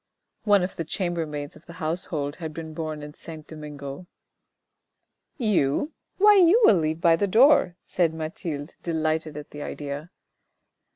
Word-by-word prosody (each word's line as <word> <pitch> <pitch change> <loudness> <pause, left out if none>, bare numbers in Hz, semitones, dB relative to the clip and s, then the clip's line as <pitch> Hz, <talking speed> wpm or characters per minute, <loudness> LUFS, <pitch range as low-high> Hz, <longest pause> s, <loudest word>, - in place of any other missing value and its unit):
(One 205 -3 +5
of 185 - -4
the 165 - -1
chambermaids 160 -4 -3
of 155 - -18
the 170 - -10
household 155 -3 -3
had 160 -4 -6
been 160 -1 -6
born 155 -2 -4
in 150 0 -8
Saint 155 -1 -10
Domingo.) 150 +1 -8 1.3
"You? 215 - +1 0.2
Why 415 +1 +7
you 370 +4 +6
will 205 - +7
leave 160 0 -1
by 170 -2 +5
the 200 +4 0
door," 230 - +5
said 170 -3 +1
Mathilde, 160 -2 -5
delighted 155 -2 -1
at 150 - -9
the 145 - -8
idea. 145 +2 -5
160 Hz, 150 wpm, -25 LUFS, 150-180 Hz, 1.3 s, Why